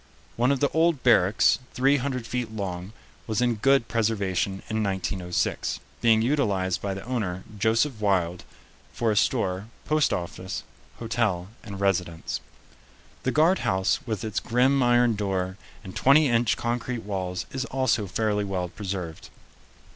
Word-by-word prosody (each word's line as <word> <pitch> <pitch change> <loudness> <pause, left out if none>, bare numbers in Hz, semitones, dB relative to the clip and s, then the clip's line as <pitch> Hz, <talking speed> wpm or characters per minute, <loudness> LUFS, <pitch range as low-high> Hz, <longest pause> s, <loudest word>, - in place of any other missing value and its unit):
One 125 +3 +2
of 140 - 0
the 145 - +3
old 160 -3 +2
barracks, 105 -4 +4 0.2
three 135 +3 +4
hundred 130 -3 -3
feet 120 -1 -3
long, 95 -3 -4 0.4
was 110 -2 0
in 125 -1 +2
good 135 +1 +3
preservation 100 -4 0
in 110 0 -1
1906, 95 -3 -1 0.2
being 110 -1 +4
utilized 100 -9 +1
by 100 -1 -2
the 95 - -7
owner, 105 -7 -3 0.2
Joseph 110 +3 +1
Wilde, 90 -4 +1 0.5
for 115 -2 0
a - - 0
store, 100 -3 +1 0.2
post 155 -1 +2
office, 90 +1 -4 0.3
hotel, 110 -6 -1
and 100 -4 -7
residence. 90 -4 -1 0.8
The 130 - 0
guard 165 +6 +4
house 95 +2 +1
with 110 -4 -2
its 110 -2 -1
grim 130 +3 +2
iron 120 -1 +4
door 95 -2 -2 0.3
and 95 -2 -9
twenty 145 +3 +5
inch 120 -2 +2
concrete 120 0 -2
walls 95 -3 -3
is 130 -1 -3
also 130 -5 0
fairly 105 +1 0
well 95 -3 -2
preserved. 95 -4 -6
110 Hz, 145 wpm, -26 LUFS, 95-125 Hz, 0.8 s, twenty